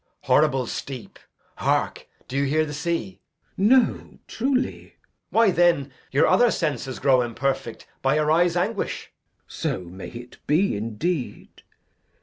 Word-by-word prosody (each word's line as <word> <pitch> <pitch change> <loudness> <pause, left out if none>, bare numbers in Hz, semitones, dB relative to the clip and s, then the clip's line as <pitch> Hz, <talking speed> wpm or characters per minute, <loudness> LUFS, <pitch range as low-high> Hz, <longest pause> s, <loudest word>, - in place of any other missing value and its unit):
Edg. - - -45 0.2
Horrible 130 -1 +3
steep. 130 0 -7 0.4
Hark, - - 0 0.2
do 130 - -7
you 140 +1 +2
hear 155 +3 +2
the 150 - -6
sea? 150 - -3 0.4
Glou. 195 - +2
No, 255 -2 +2
truly. 260 +3 -1
Edg. - - -39 0.2
Why, 225 -3 +4
then, 170 -6 +3 0.2
your 140 - +3
other 245 0 +5
senses 145 - -2
grow 130 -2 +4
imperfect 130 +1 -3 0.2
By 135 +2 +2
your 155 0 +2
eyes' 175 +1 +3
anguish. 200 +4 -2
Glou. - - -49
So - - -3
may 90 +2 -9
it 120 +1 -11
be 160 - +2
indeed. 120 - -4
150 Hz, 145 wpm, -24 LUFS, 130-175 Hz, 0.4 s, other